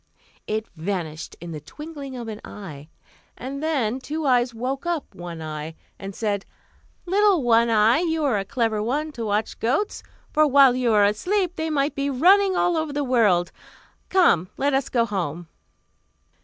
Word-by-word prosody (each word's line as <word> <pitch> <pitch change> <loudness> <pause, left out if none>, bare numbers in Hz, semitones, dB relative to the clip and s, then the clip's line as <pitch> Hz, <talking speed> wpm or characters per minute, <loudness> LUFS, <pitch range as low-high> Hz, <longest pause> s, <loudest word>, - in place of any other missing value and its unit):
It 220 +1 -2
vanished 160 -3 -4
in 170 0 -8
the 155 - -5
twinkling 285 - -9
of 235 -2 -6
an 215 -1 -7
eye; 155 -8 -9 0.5
and 275 +2 -6
then 265 -7 0
Two 300 +4 -4
Eyes 250 -2 +3
woke 260 +6 -4
up 340 -4 -2
One 170 -2 -7
Eye, 155 +1 -6 0.2
and 195 0 -7
said, 205 -3 -1 0.6
"Little 390 -3 +3
One 235 -1 +4
Eye, 225 +4 +4
you 325 -2 0
are 250 -8 +2
a - - -2
clever 220 0 -1
one 290 +8 -1
to 235 -5 -6
watch 210 0 -1
goats; 275 - 0 0.3
for, 310 -1 +4
while 275 -2 +6
you 250 -2 +1
are 210 -2 +5
asleep, 355 - 0
they 320 0 -2
might 290 -1 0
be 280 0 -1
running 375 +8 +4
all 355 -1 +2
over 315 -2 -2
the 290 0 -1
world. 210 -9 +2 0.6
Come, 185 - +3
let 285 0 +1
us 270 -1 0
go 235 -2 +2
home!" 175 -6 -4
245 Hz, 170 wpm, -23 LUFS, 205-300 Hz, 0.6 s, while